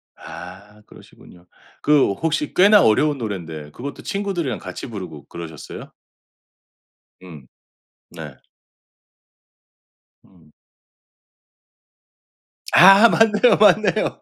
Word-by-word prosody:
아 100 +4 -13
그러시군요. 90 0 -19 0.4
그 150 -7 +2
혹시 155 +5 -3
꽤나 205 +2 +5
어려운 145 +7 +1
노래인데 85 - -7
그것도 140 - -9
친구들이랑 195 - -4
같이 - - -9
부르고 90 - -10
그러셨어요? 80 -3 -11 1.3
음. 80 -7 -14 0.7
네. - - -11 1.9
음. 85 -5 -25 2.2
아. 195 +5 +7
맞네요, 225 +1 +2
맞네요. 210 0 +1
125 Hz, 195 characters per minute, -19 LUFS, -, 2.2 s, 아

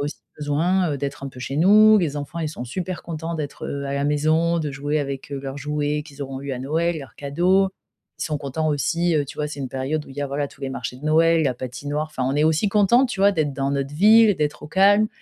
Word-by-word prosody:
a 145 - -1
aussi 150 - -6 0.2
besoin, 165 +4 +1
heu, - - -2
d'être 140 0 -5
un - - -4
peu 130 - -13
chez 135 +3 -4
nous, 215 +5 +7
les 150 -5 -1
enfants 145 +4 -5
ils 155 - -1
sont 125 -5 -7
super 175 +7 -5
contents 165 0 -5
d'être, 150 -2 -5
heu, 140 0 -4
à 140 - -3
la 140 0 -1
maison, 155 +3 +2
de 150 -3 -2
jouer 145 +2 -1
avec, 140 -1 -5
heu, 140 - -3
leurs 135 0 -6
jouets 150 +1 -1
qu'ils 145 -2 -9
auront 135 -1 -6
eu 140 -1 -5
à 125 - -4
Noël, 160 +5 -1
leurs 135 -2 -11
cadeaux. 180 +7 +2 0.5
Ils - - -1
sont 150 -2 -2
contents 150 +3 -2
aussi, 165 +4 +1
heu, 145 - +1
tu - - -11
vois 150 0 -1
c'est 145 - -8
une 130 - -3
période 140 +4 -2
où - - -13
il - - -11
y - - -3
a, 140 - -1
voilà, 140 +1 -2
tous - - -20
les 135 - -3
marchés 125 -2 -5
de 145 - -13
Noël, 165 +1 +4
la 130 -3 +1
patinoire, 145 +5 -4
enfin 150 -4 -5
on 135 +2 0
est 150 - +3
aussi 160 +6 +2
content 210 +6 +4
tu 240 - -6
vois 200 +1 +5
d'être 150 -5 0
dans 135 0 -1
notre 140 0 -2
ville, 215 +3 +6
d'être 150 0 -2
au 150 - -9
calme 205 +4 +4
150 Hz, 270 wpm, -22 LUFS, 140-170 Hz, 0.5 s, nous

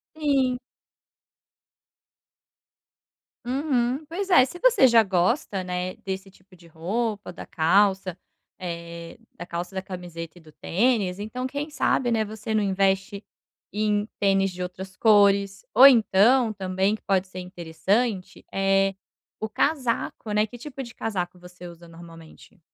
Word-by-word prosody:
Sim. 275 -5 +1 2.9
Uhum, 260 +1 -1
pois 370 +5 -4
é, 350 -9 +6
se 270 +7 -8
você - - +5
já 235 -2 +6
gosta, 190 - 0
né, 180 0 -4
desse 190 0 -6
tipo 185 0 -23
de 175 -1 -18
roupa, 205 +7 -3
da - - -10
calça, 190 +2 +2 0.4
eh, 170 -2 -7 0.2
da 175 - -9
calça, 175 +3 -5
da 190 - -2
camiseta 175 -3 -8
e - - -14
do 155 -1 -17
tênis, 200 -1 0
então 225 +5 -4
quem 285 +3 -5
sabe, 265 -4 +1
né, 225 -2 +1
você 215 +1 -6
não 215 - +2
investe 195 +1 0 0.5
em 210 0 0
tênis 195 -1 +2
de 180 0 -7
outras 185 +1 -7
cores, 200 -2 +3
ou 255 +5 +10
então 230 -1 +5
também 190 0 -1
que - - -25
pode 190 -1 0
ser 185 - -9
interessante, 185 +4 -2
eh, 195 0 +2 0.5
o 220 - -3
casaco, 240 -3 -1
né, 210 +1 +2
que 245 +3 -12
tipo 275 +1 -7
de 235 -2 -11
casaco 180 -5 -4
você 180 0 -12
usa 170 0 -12
normalmente? 165 +3 -15
195 Hz, 140 wpm, -25 LUFS, 180-235 Hz, 2.9 s, ou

